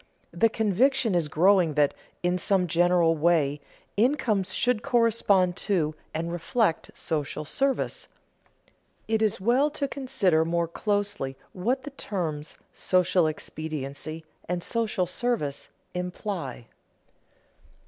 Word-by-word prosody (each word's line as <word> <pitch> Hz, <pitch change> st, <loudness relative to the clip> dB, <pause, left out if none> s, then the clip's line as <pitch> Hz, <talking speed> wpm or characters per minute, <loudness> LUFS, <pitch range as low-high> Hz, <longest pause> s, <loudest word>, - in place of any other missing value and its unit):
The 175 Hz, +7 st, +3 dB
conviction 225 Hz, +2 st, +2 dB
is 170 Hz, -3 st, +1 dB
growing 175 Hz, 0 st, +3 dB
that, 145 Hz, -2 st, +3 dB, 0.3 s
in 180 Hz, +1 st, +1 dB
some 190 Hz, 0 st, +2 dB
general 175 Hz, -1 st, +3 dB
way, 150 Hz, -3 st, +2 dB, 0.3 s
incomes 220 Hz, -5 st, +1 dB
should 245 Hz, -3 st, +1 dB
correspond 215 Hz, -7 st, +3 dB
to, 165 Hz, -7 st, 0 dB, 0.2 s
and 165 Hz, +2 st, -3 dB
reflect, 175 Hz, +1 st, 0 dB
social 150 Hz, -1 st, -3 dB
service. 270 Hz, -, -1 dB, 1.0 s
It 220 Hz, 0 st, +1 dB
is 215 Hz, -4 st, +1 dB
well 245 Hz, +9 st, +3 dB
to 290 Hz, -1 st, -2 dB
consider 195 Hz, -, +1 dB
more 170 Hz, +1 st, 0 dB
closely 205 Hz, -8 st, -2 dB, 0.2 s
what 245 Hz, +9 st, -1 dB
the 290 Hz, -, -7 dB
terms 160 Hz, -, -4 dB, 0.2 s
social 180 Hz, -2 st, +2 dB
expediency 155 Hz, 0 st, -5 dB, 0.2 s
and 180 Hz, -1 st, -1 dB
social 220 Hz, -5 st, 0 dB
service 205 Hz, -, -2 dB, 0.3 s
imply. 180 Hz, -, -4 dB
180 Hz, 110 wpm, -27 LUFS, 160-220 Hz, 1.0 s, The